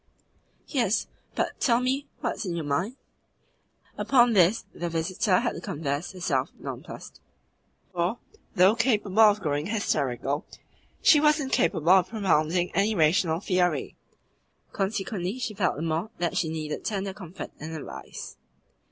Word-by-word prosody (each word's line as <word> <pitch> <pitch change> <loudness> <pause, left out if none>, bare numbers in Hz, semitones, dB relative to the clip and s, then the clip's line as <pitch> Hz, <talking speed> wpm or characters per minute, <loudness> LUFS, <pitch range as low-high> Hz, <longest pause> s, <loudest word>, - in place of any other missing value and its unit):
"Yes, 235 - +1 0.3
but - - -2
tell 235 -4 +3
me 265 +3 -1
what - - 0
is - - -4
in 175 - -2
your 165 -3 -3
mind?" 170 - -1 1.0
Upon 240 -3 +4
this 195 +3 +4
the 175 - -3
visitor 180 +4 +1
had - - 0
to 170 - -7
confess 145 +1 -3
herself 145 -8 -1
nonplussed; - - -8 0.7
for, 175 +6 0 0.4
though 185 +3 +6
capable 220 -4 +1
of 210 -2 +6
growing 150 -1 -1
hysterical, 145 - -1 0.6
she 300 - +7
was 300 +1 +4
incapable 170 - +1
of 185 -1 +6
propounding 175 -5 +1
any 205 +4 +2
rational 160 0 +2
theory. 180 -7 0 0.8
Consequently 195 0 -2
she 240 -4 -3
felt 195 -3 0
the 155 - -4
more 165 +5 -1
that 170 -1 -1
she 160 - 0
needed 155 -1 -4
tender 195 -2 -2
comfort 190 -3 -8
and 160 +1 -6
advice. 65 - -8
180 Hz, 140 wpm, -27 LUFS, 160-215 Hz, 1.0 s, she